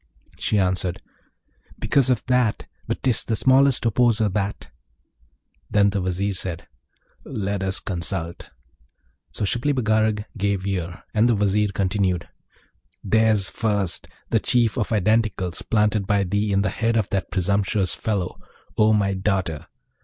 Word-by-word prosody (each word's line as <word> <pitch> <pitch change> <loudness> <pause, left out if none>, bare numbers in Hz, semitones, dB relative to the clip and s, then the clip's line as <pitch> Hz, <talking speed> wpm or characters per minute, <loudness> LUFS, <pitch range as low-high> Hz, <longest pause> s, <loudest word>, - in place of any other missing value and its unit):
She 105 - +1
answered, 90 -1 0 0.8
'Because 135 -3 +2
of 125 -3 +1
that; 125 -4 +1 0.2
but - - -3
'tis 125 -3 +2
the 115 - -1
smallest 130 +3 +4
opposer, 115 -1 +3
that.' 95 -9 -3 1.0
Then 100 -1 +3
the 100 -1 -1
Vizier 95 +2 -1
said, 90 -2 -4 0.6
'Let 100 -5 -3
us 95 0 -1
consult.' 85 -2 -3 0.8
So 85 +10 -3
Shibli 120 +8 0
Bagarag 110 -3 +1
gave 100 -2 -1
ear, 90 -3 -3
and 110 +2 +3
the 120 - +3
Vizier 105 +1 +2
continued, 95 -2 0 0.8
'There's 110 -2 +2
first, 105 -5 -1 0.2
the - - +3
Chief 120 -3 +2
of 115 -5 -1
Identicals 105 -4 0
planted 105 -2 +2
by 100 -1 +2
thee 100 +3 -1
in 100 0 +2
the 95 - 0
head 115 +2 0
of 105 -3 +1
that 95 -2 -1
presumptuous 100 0 0
fellow, 100 -5 -3 0.4
O 110 0 +5
my 100 -2 +2
daughter! 95 -5 -2
100 Hz, 140 wpm, -23 LUFS, 95-110 Hz, 1.0 s, O